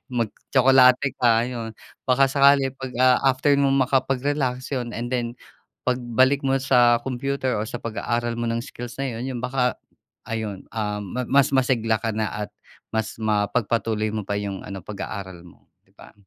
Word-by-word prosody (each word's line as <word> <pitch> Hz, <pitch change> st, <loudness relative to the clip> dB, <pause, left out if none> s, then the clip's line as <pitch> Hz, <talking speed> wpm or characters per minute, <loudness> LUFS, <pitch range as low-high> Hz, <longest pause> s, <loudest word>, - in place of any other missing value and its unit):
Magtsokolate 130 Hz, +2 st, +3 dB
ka, 115 Hz, -1 st, +4 dB
ayon. 115 Hz, -3 st, -6 dB, 0.3 s
Baka 130 Hz, +2 st, +5 dB
sakali 140 Hz, -1 st, +4 dB
pag, 130 Hz, -1 st, -7 dB
ah, 125 Hz, 0 st, +5 dB
after 135 Hz, +3 st, +2 dB
mo 140 Hz, -, +3 dB
makapag-relax 130 Hz, 0 st, 0 dB
yun, 120 Hz, -3 st, -3 dB
and 120 Hz, +2 st, -4 dB
then 120 Hz, -1 st, -1 dB, 0.5 s
pagbalik 130 Hz, +2 st, +2 dB
mo 135 Hz, 0 st, +2 dB
sa 120 Hz, -3 st, +4 dB
computer, 130 Hz, 0 st, -2 dB
or 105 Hz, -, -1 dB
sa 120 Hz, +2 st, -6 dB
pag-aaral 120 Hz, +1 st, -2 dB
mo 120 Hz, -, -2 dB
ng 115 Hz, 0 st, -1 dB
skills 120 Hz, +1 st, -8 dB
na 135 Hz, -, -1 dB
yun, 120 Hz, -, -5 dB
yun 120 Hz, -, -4 dB
baka, 125 Hz, 0 st, 0 dB, 0.5 s
ayun, 110 Hz, -4 st, -4 dB
um, 105 Hz, -2 st, -3 dB, 0.2 s
ma 125 Hz, -, -1 dB
mas 140 Hz, +2 st, +4 dB
masigla 125 Hz, -4 st, +2 dB
ka 110 Hz, +2 st, -3 dB
na 110 Hz, 0 st, -1 dB, 0.2 s
at -, -, -26 dB, 0.4 s
mas 110 Hz, -1 st, -2 dB
mapagpatuloy 110 Hz, 0 st, 0 dB
mo 110 Hz, -, -2 dB
pa 100 Hz, -, -1 dB
yung 100 Hz, -2 st, -4 dB
ano 95 Hz, -3 st, -8 dB
pag-aaral 100 Hz, -3 st, -6 dB
mo, -, -, -21 dB, 0.2 s
'di -, -, -33 dB
ba? -, -, -15 dB
120 Hz, 165 wpm, -23 LUFS, 110-130 Hz, 0.5 s, Baka